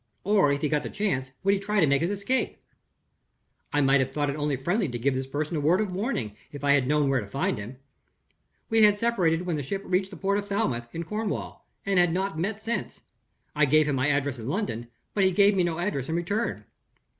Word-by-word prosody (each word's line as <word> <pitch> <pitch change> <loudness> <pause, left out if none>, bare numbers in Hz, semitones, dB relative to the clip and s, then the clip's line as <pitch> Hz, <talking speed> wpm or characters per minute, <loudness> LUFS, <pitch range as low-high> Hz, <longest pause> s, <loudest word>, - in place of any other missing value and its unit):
or, 195 -7 +4
if 140 0 -1
he 150 - +1
got 150 0 +1
the - - -5
chance, 180 -11 -1
would 195 +1 +4
he 200 - +1
try 205 +1 0
to 160 - +5
make 140 0 +2
his 170 - +1
escape? 205 +6 -1 1.1
"I 145 - +2
might 135 0 +4
have 130 0 +1
thought 145 0 0
it - - -5
only 150 -1 -1
friendly 175 - 0
to 120 - -4
give 130 +4 +1
this 130 0 -3
person 150 +4 -3
a - - 0
word 165 +6 +3
of 210 -3 -1
warning, 180 - -2 0.2
if 145 -1 -9
I 140 - +3
had 135 -3 +3
known 150 0 +2
where 135 -2 +2
to 100 - -8
find 135 +1 -1
him. 115 +6 -8 0.9
We 225 -1 +3
had 210 -1 +6
separated 180 -7 +1
when 170 -4 -1
the - - -2
ship 195 +9 -4
reached 190 +1 0
the 190 - -10
port 200 +3 +1
of 205 - -6
Falmouth, 135 - -1
in 165 - -3
Cornwall, 210 +5 -4 0.2
and 195 -2 +2
had 175 -2 +3
not 190 0 -1
met 200 +5 -2
since. 225 +2 -4 0.5
I 150 -1 +4
gave 155 +2 +4
him 145 - +1
my 130 +2 +1
address 140 -3 0
in 115 - -6
London; 140 - -2 0.3
but 200 - +2
he 190 - +5
gave 200 +2 +4
me 190 - +3
no 170 -2 -1
address 170 -7 -2
in 160 - -1
return. 200 +7 -2
165 Hz, 240 wpm, -26 LUFS, 140-200 Hz, 1.1 s, had